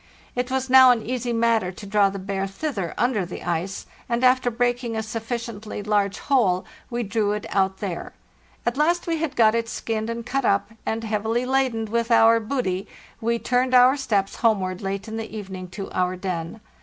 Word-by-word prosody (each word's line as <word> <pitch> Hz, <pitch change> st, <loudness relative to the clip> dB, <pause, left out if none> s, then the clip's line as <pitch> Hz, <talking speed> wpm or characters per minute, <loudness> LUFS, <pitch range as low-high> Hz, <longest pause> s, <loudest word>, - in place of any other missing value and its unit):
It 250 Hz, +1 st, -1 dB
was 265 Hz, 0 st, -1 dB
now 260 Hz, 0 st, +8 dB
an 240 Hz, -3 st, +3 dB
easy 245 Hz, 0 st, -2 dB
matter 230 Hz, -5 st, +2 dB
to 205 Hz, -, -10 dB
draw 200 Hz, 0 st, +3 dB
the 195 Hz, -, -6 dB
bear 195 Hz, 0 st, -3 dB
thither 195 Hz, -, -4 dB
under 240 Hz, -4 st, +1 dB
the 175 Hz, -, -7 dB
ice, 175 Hz, +3 st, -2 dB, 0.2 s
and 235 Hz, +1 st, 0 dB
after 255 Hz, -1 st, +4 dB
breaking 245 Hz, 0 st, -1 dB
a 220 Hz, -, -1 dB
sufficiently 225 Hz, -2 st, -5 dB
large 205 Hz, -1 st, +1 dB
hole 200 Hz, -10 st, +2 dB, 0.2 s
we 240 Hz, 0 st, -2 dB
drew 205 Hz, 0 st, 0 dB
it 210 Hz, -, -4 dB
out 190 Hz, -1 st, +1 dB
there. 190 Hz, -5 st, -4 dB, 0.5 s
At 240 Hz, +2 st, 0 dB
last 340 Hz, +4 st, +2 dB
we 330 Hz, -1 st, 0 dB
had 310 Hz, -3 st, -3 dB
got 220 Hz, -2 st, +5 dB
it 230 Hz, 0 st, -1 dB
skinned 220 Hz, 0 st, -3 dB
and 230 Hz, 0 st, -4 dB
cut 275 Hz, +2 st, -1 dB
up, 200 Hz, -1 st, +1 dB, 0.2 s
and, 225 Hz, +1 st, -1 dB
heavily 225 Hz, +3 st, -1 dB
laden 260 Hz, -4 st, +1 dB
with 230 Hz, +2 st, -1 dB
our 230 Hz, -1 st, +6 dB
booty, 215 Hz, -5 st, -2 dB, 0.3 s
we 235 Hz, +1 st, +1 dB
turned 250 Hz, +2 st, +1 dB
our 250 Hz, +2 st, +7 dB
steps 210 Hz, -8 st, -1 dB
homeward 190 Hz, -5 st, +1 dB
late 195 Hz, +2 st, -3 dB
in 220 Hz, 0 st, -5 dB
the 220 Hz, -1 st, -6 dB
evening 190 Hz, -3 st, -7 dB
to 195 Hz, +2 st, -7 dB
our 180 Hz, 0 st, 0 dB
den. 180 Hz, -3 st, -4 dB
225 Hz, 195 wpm, -24 LUFS, 200-245 Hz, 0.5 s, now